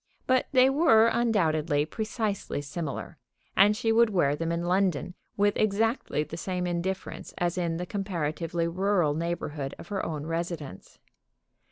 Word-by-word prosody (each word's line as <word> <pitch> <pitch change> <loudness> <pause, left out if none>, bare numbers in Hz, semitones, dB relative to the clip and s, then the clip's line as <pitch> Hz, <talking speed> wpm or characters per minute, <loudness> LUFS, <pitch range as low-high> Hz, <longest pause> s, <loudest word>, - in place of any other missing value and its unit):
But 255 0 +2
they 260 -2 +6
were 270 -6 +5
undoubtedly 160 -10 +1
precisely 215 - -3
similar, 145 +1 -5 0.4
and 205 +2 +5
she 225 -1 +1
would 230 0 +5
wear 160 -8 +2
them 165 +2 -2
in 170 +1 -1
London 180 -2 +1 0.2
with 205 0 +3
exactly 215 - +1
the 155 +2 -8
same 180 +1 -2
indifference 175 +2 -4
as 175 -1 0
in 170 -2 -1
the 180 - -3
comparatively 170 -4 -2
rural 180 -3 +1
neighborhood 155 -4 -3
of - - -11
her 200 -2 -2
own 150 -2 -4
residence. 165 - -5
175 Hz, 145 wpm, -28 LUFS, 165-205 Hz, 0.4 s, they